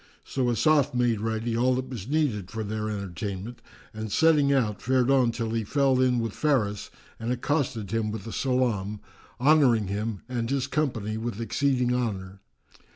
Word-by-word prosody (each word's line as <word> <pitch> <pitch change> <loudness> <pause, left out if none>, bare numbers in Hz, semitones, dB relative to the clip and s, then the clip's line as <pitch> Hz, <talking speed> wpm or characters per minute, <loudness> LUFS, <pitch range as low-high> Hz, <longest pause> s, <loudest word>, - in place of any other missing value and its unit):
So 130 -2 -1
Asaf 145 +2 +3
made 120 -3 +1
ready 115 +1 -1
all 125 +2 +2
that 130 0 -3
was 115 -6 -6
needed 130 - 0
for 110 +2 -4
their 110 +1 -3
entertainment 100 +2 -5 0.3
and 110 -1 -5
setting 150 -1 +4
out, 115 -7 +1
fared 130 +1 +2
on 130 -3 +4
till 115 -1 -3
he 115 -1 -1
fell 135 +3 +2
in 125 -1 +3
with 115 -3 -2
Faris 110 -9 0 0.3
and 115 +2 -2
accosted 125 - -1
him 115 -1 0
with 110 -3 -5
the 115 - -7
salam, 115 -6 0 0.4
honouring 125 -7 +4
him 105 0 -3
and 120 -2 -2
his 135 -1 0
company 125 -8 -1
with 115 -1 -4
exceeding 125 +1 +1
honour. 100 -6 -3
115 Hz, 165 wpm, -26 LUFS, 110-130 Hz, 0.4 s, setting